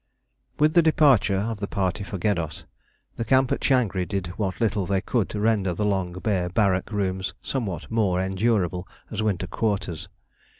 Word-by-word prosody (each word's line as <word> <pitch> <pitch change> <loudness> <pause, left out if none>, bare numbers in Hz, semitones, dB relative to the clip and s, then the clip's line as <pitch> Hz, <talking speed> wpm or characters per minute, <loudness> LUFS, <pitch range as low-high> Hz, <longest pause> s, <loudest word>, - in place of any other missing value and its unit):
With 155 +1 +3
the 170 - +6
departure 140 -11 +4
of 110 +2 -2
the 100 - -3
party 95 +1 -1
for 100 0 -5
Geddos, 85 -5 -1 0.5
the - - -1
camp 130 +2 +3
at - - +1
Changri 115 -9 +2
did 100 -3 -2
what 95 -4 -2
little 105 -5 0
they 100 -1 +1
could 110 0 -1
to 105 - -4
render 105 -5 +1
the 105 - -1
long 95 -3 0
bare 95 -1 -1
barrack 95 0 +1
rooms 95 -2 -2
somewhat 100 - -3
more 100 -5 +2
endurable 95 -2 0 0.2
as - - -2
winter 105 -4 0
quarters. 95 -6 -2
100 Hz, 170 wpm, -25 LUFS, 95-110 Hz, 0.5 s, the